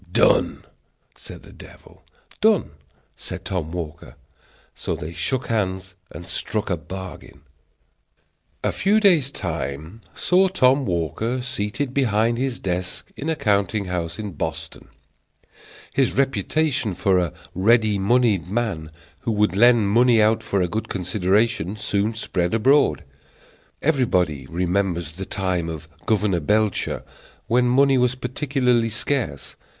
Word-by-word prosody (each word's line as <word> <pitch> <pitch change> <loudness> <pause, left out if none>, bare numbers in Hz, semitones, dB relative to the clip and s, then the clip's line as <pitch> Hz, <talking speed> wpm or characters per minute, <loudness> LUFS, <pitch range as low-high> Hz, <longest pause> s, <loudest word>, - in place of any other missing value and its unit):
"Done!" - - +2 0.5
said - - -11
the - - -14
devil. - - -15 0.4
"Done!" 215 -4 +3 0.4
said - - -8
Tom 85 -5 -3
Walker. 85 -2 -7 0.6
So - - -3
they 80 +3 -7
shook 130 +7 -2
hands 95 -4 -2 0.2
and 85 - -9
struck 105 +3 -3
a - - +2
bargain. 95 +4 -9 1.2
A - - +1
few 210 +3 +2
days' 175 -10 +4
time 85 - -5
saw 185 +2 +3
Tom 135 - +3
Walker 90 - -1
seated 125 +2 -3
behind 115 -3 +1
his 130 -2 -2
desk 90 -1 -4
in 150 - -4
a 160 - +1
counting 100 - +1
house 85 -2 -3
in 105 -2 -5
Boston. 80 0 -5 1.1
His 135 -2 +1
reputation 135 - 0
for 95 0 +2
a 85 -4 -1 0.2
ready 110 +1 +3
moneyed 100 -4 +2
man, 100 -8 -2 0.3
who 115 - -2
would 105 -3 +1
lend 120 0 +5
money 120 +2 +4
out 110 +1 +3
for 100 -3 -1
a 90 - +1
good 110 +6 -4
consideration, 95 +1 0
soon 105 0 -1
spread 90 -3 -1
abroad. 135 +6 +3 0.8
Everybody 90 - +1
remembers 85 -2 -1
the 95 - -4
time 90 -4 -2
of 80 -1 -7 0.2
Governor 105 -4 +2
Belcher, 105 +5 0 0.4
when 125 +1 +2
money 135 +1 +4
was 125 0 +2
particularly 125 -2 0
scarce. 115 - -2
105 Hz, 130 wpm, -22 LUFS, 90-125 Hz, 1.2 s, lend